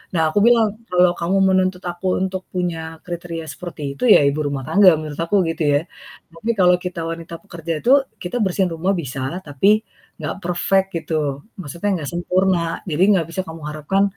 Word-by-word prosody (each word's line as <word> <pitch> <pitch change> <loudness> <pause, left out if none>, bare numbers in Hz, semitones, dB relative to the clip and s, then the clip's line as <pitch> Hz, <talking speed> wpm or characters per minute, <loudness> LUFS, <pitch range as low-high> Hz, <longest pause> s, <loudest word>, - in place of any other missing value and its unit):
Nah 165 - +3
aku 205 - +1
bilang, 235 -2 +5 0.2
"Kalau 180 0 +5
kamu 180 +3 +1
menuntut 185 -1 +2
aku 180 +2 -1
untuk 190 0 -2
punya 165 -3 -3
kriteria 170 -2 -5
seperti 150 -5 -6
itu - - -7
ya - - +7
ibu 140 +2 0
rumah 140 -1 -3
tangga 195 -3 +6
menurut 155 -2 -6
aku," 165 +5 0
gitu 165 0 -2
ya. 145 - +4 0.5
Tapi 220 +8 -2
kalau 180 -1 +6
kita 180 -2 -4
wanita 165 0 -6
pekerja 170 -4 -5
itu 245 - +2 0.3
kita 180 +7 -3
bersihin 190 -1 +1
rumah 180 +4 0
bisalah, 135 +2 -4
tapi 195 +10 +2 0.4
gak - - -3
perfect 185 +2 +1
gitu, 150 -4 -2 0.2
maksudnya 175 +1 -3
gak 140 - -3
sempurna. 175 -1 0
Jadi 160 +3 +2
gak 170 - +1
bisa 190 - -2
kamu 160 0 -8
harapkan 155 +6 0
175 Hz, 180 wpm, -20 LUFS, 160-185 Hz, 0.5 s, ya